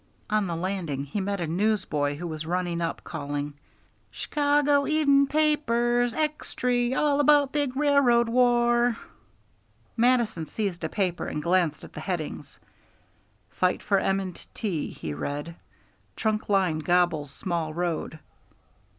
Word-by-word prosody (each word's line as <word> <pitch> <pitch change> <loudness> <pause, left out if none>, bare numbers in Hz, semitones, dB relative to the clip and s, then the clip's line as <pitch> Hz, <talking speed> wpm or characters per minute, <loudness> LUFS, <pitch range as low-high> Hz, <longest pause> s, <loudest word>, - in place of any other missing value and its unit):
On 210 -2 +2
the 170 - -2
landing 170 -6 -3
he 195 +9 -3
met 200 +1 -2
a 170 - -1
newsboy 170 -5 0
who 170 +4 -6
was 155 -2 -5
running 175 -1 -1
up, 165 - -3
calling: 145 0 -4 0.6
"Shcago 290 -1 +1
Even' 280 -3 +4
Papers! 245 -6 +1
Extry! 250 -5 -1
All 290 +1 +2
about 290 -1 +4
big 285 -4 -1
railroad 275 -5 +4
war!" 240 0 +3 1.0
Mattison 230 -8 +2
seized 195 -6 -3
a 160 - -1
paper 180 -2 -1
and 150 - -4
glanced 170 -3 +1
at - - -12
the - - -7
headings. 175 -6 -5 0.9
"Fight 180 0 0
for 200 -2 +2
M. 195 -1 -1
& - - -24
T.," 185 -9 -2
he 75 - -6
read. 145 - -4 0.6
"Trunk 215 -1 -1
Line 185 -6 +2
Gobbles 175 -3 +1
Small 170 -1 -3
Road." 170 -1 -3
200 Hz, 135 wpm, -26 LUFS, 170-250 Hz, 1.0 s, Even